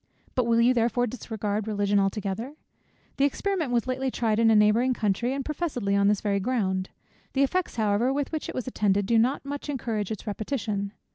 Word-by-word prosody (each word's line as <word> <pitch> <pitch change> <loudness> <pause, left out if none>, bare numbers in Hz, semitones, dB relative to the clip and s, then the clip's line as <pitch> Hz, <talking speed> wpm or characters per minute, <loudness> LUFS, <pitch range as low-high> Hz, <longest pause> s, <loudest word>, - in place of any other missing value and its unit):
But 250 - +1
will 230 0 +3
you 240 +2 +5
therefore 240 0 +2
discard 215 -3 -3
Religion 205 -1 +1
altogether? 200 +6 -2 0.6
The 275 - +4
experiment 330 -1 -1
was 240 -2 +1
lately 260 +1 -1
tried 225 -3 0
in 230 -1 +5
a 220 - +5
neighbouring 220 +5 +4
country, 220 +3 0
and 275 0 -3
professedly 275 -11 -1
on 200 0 +3
this 205 -1 +2
very 200 -2 0
ground. 190 -4 -1 0.4
The 275 - +3
effects 365 +6 0
however 220 +2 +2
with 280 0 -2
which 315 -2 -3
it - - -6
was 255 - -3
attended, 205 -5 +1
do 230 +2 +3
not 255 +5 +1
much 285 +1 -5
encourage 225 -7 -2
its 220 -3 -5
repetition. 205 -2 -3
230 Hz, 195 wpm, -26 LUFS, 205-260 Hz, 0.6 s, you